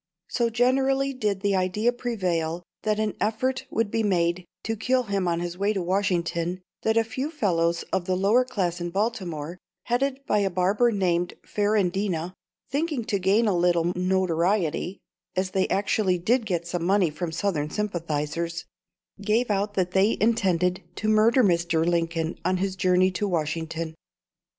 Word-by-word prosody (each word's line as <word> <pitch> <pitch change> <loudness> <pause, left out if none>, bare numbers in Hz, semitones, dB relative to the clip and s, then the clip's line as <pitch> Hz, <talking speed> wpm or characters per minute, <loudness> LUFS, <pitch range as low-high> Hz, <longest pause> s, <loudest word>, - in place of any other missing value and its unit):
So 235 -2 +1
generally 270 +3 +2
did 210 -6 -1
the 200 -1 +1
idea 190 +6 +1
prevail 180 -9 -2 0.2
that 215 -1 0
an 215 -1 -1
effort 255 +5 -1
would 225 -4 -1
be 225 - +1
made 175 -3 +1 0.2
to 225 - -2
kill 255 +4 +1
him 200 -4 -1
on 170 0 0
his 175 +1 -5
way 205 +2 +2
to 190 -3 -2
Washington, 180 -1 -1 0.2
that 220 0 +1
a 230 - +5
few 255 +6 -4
fellows 170 - 0
of 190 -2 0
the 185 - 0
lower 205 +7 +4
class 180 -8 -2
in 175 - -2
Baltimore, 185 -5 -3 0.2
headed 260 +3 0
by 210 - +2
a 200 -1 +1
barber 190 +6 +2
named 180 -4 0
Ferrandina, 195 -4 0 0.3
thinking 285 -3 -1
to 205 -4 0
gain 200 +5 +3
a 200 - +2
little 175 0 +2
notoriety 180 0 0 0.4
as 185 0 -1
they 190 0 +1
actually 195 -1 +1
did 225 +6 +1
get 170 -3 -1
some 170 0 -3
money 185 -2 +3
from 160 +2 -4
Southern 160 -3 -1
sympathisers 170 -3 -3 0.6
gave 220 +3 +1
out 205 +1 -1
that 185 -2 0
they 195 +4 +3
intended 185 -5 +2
to 215 - -1
murder 225 +4 +5
Mr. 170 -3 +2
Lincoln 165 -1 -1
on 185 +2 +1
his 190 +1 -1
journey 185 0 +3
to 205 +3 -2
Washington. 160 -1 -2
190 Hz, 160 wpm, -25 LUFS, 175-215 Hz, 0.6 s, a